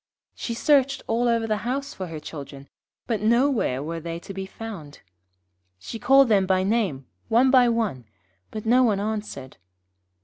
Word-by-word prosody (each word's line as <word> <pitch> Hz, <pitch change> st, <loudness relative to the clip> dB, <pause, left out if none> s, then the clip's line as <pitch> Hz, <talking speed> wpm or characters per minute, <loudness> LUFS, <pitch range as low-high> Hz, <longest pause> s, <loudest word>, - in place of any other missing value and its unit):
She 235 Hz, -, -5 dB
searched 275 Hz, +1 st, +2 dB
all 235 Hz, +2 st, 0 dB
over 230 Hz, -1 st, +1 dB
the 215 Hz, -1 st, 0 dB
house 275 Hz, +5 st, -3 dB
for 185 Hz, -, -6 dB
her 160 Hz, -2 st, -7 dB
children, 140 Hz, -2 st, -9 dB, 0.4 s
but 225 Hz, -4 st, -2 dB
nowhere 235 Hz, -, +2 dB
were 165 Hz, +2 st, -4 dB
they 165 Hz, +1 st, -5 dB
to 195 Hz, -, -9 dB
be 190 Hz, 0 st, -5 dB
found. 195 Hz, -10 st, -9 dB, 0.8 s
She 160 Hz, -, -8 dB
called 270 Hz, +2 st, +5 dB
them 200 Hz, -4 st, +3 dB
by 185 Hz, 0 st, +2 dB
name, 195 Hz, -, 0 dB, 0.2 s
one 240 Hz, +3 st, +4 dB
by 250 Hz, -2 st, +6 dB
one, 215 Hz, -, -1 dB, 0.4 s
but 215 Hz, 0 st, -7 dB
no 245 Hz, +3 st, +4 dB
one 215 Hz, -6 st, +2 dB
answered. 205 Hz, -11 st, -5 dB
215 Hz, 165 wpm, -24 LUFS, 170-240 Hz, 0.8 s, by